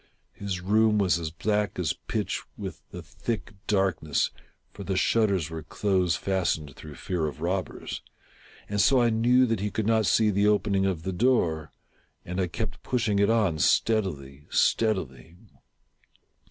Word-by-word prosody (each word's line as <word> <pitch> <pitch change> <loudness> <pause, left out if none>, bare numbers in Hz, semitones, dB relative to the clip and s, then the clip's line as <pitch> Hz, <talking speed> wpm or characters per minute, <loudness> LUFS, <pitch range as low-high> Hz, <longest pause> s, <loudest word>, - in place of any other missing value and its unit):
His 95 -3 -4
room 105 +3 +3
was 95 -4 +2
as 80 -2 -3
black 105 +5 -1
as 90 -4 0
pitch - - -3 0.2
with - - -7
the - - -8
thick 115 -2 -5
darkness, 95 -7 +1 0.4
(for 100 - -8
the 95 -1 -2
shutters 100 -7 +2
were 80 -1 -5
close 90 +1 0
fastened, 85 -7 -1
through 75 -2 -10
fear 85 +1 -2
of 75 - -7
robbers,) 90 +1 -3 0.7
and 105 0 0
so 135 +3 +5
I 120 -1 +3
knew 120 +3 +4
that 115 -4 -1
he 105 +2 -1
could 110 0 -2
not 110 -2 +2
see 110 -1 +3
the 100 +1 +2
opening 100 -2 +2
of 85 -4 -2
the 95 - -3
door, 90 - +1 0.5
and 90 +2 -2
I 90 - 0
kept 95 +1 -5
pushing 110 -5 0
it 100 +1 +3
on 105 -9 +2
steadily, 75 - 0
steadily. 85 - 0
95 Hz, 155 wpm, -27 LUFS, 85-110 Hz, 0.7 s, so